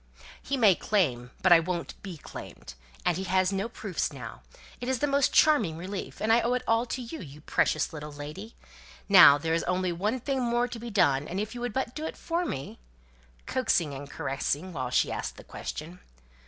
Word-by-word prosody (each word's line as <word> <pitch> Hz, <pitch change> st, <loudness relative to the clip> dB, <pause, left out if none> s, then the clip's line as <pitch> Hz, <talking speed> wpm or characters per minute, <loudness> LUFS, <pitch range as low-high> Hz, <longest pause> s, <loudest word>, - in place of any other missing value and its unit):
"He 275 Hz, -, -2 dB
may 215 Hz, -6 st, +6 dB
claim, 130 Hz, -, 0 dB
but 185 Hz, -, +4 dB
I 170 Hz, -, +9 dB
won't 170 Hz, 0 st, -3 dB
be 185 Hz, -4 st, -7 dB
claimed; 140 Hz, -, -10 dB, 0.3 s
and 175 Hz, -2 st, +2 dB
he 190 Hz, -, -3 dB
has 185 Hz, +1 st, +2 dB
no 195 Hz, +4 st, -1 dB
proofs 205 Hz, -5 st, -3 dB
now. -, -, -9 dB, 0.4 s
It 245 Hz, -, -4 dB
is 260 Hz, -, +1 dB
the 290 Hz, -, +1 dB
most 280 Hz, -1 st, +2 dB
charming 230 Hz, -, +4 dB
relief; 190 Hz, +3 st, -6 dB
and 220 Hz, +1 st, +2 dB
I 235 Hz, -, +5 dB
owe 240 Hz, +2 st, +1 dB
it 250 Hz, -, -2 dB
all 230 Hz, +2 st, +2 dB
to 255 Hz, +1 st, -4 dB
you, 240 Hz, +7 st, -7 dB
you 145 Hz, -4 st, -10 dB
precious -, -, +1 dB
little 150 Hz, -1 st, -7 dB
lady! 150 Hz, +10 st, -8 dB, 0.5 s
Now 180 Hz, -8 st, +9 dB
there's 165 Hz, +2 st, 0 dB
only 180 Hz, 0 st, 0 dB
one 210 Hz, +9 st, -1 dB
thing 270 Hz, +1 st, -1 dB
more 240 Hz, 0 st, +1 dB
to 240 Hz, -1 st, -7 dB
be 235 Hz, +1 st, -6 dB
done; 150 Hz, -9 st, +2 dB
and 185 Hz, -, -3 dB
if 215 Hz, +1 st, -3 dB
you 245 Hz, -, -7 dB
would 245 Hz, -3 st, -3 dB
but 265 Hz, -2 st, -2 dB
do 305 Hz, -, -6 dB
it -, -, -7 dB
for 345 Hz, +1 st, -1 dB
me 135 Hz, -, -5 dB, 0.3 s
" -, -, -31 dB
(coaxing 190 Hz, -, +1 dB
and 140 Hz, +1 st, -8 dB
caressing 145 Hz, +6 st, -2 dB
while 130 Hz, -4 st, -3 dB
she -, -, +2 dB
asked -, -, -4 dB
the -, -, -11 dB
question). 170 Hz, +4 st, -7 dB
190 Hz, 210 wpm, -28 LUFS, 155-235 Hz, 0.5 s, I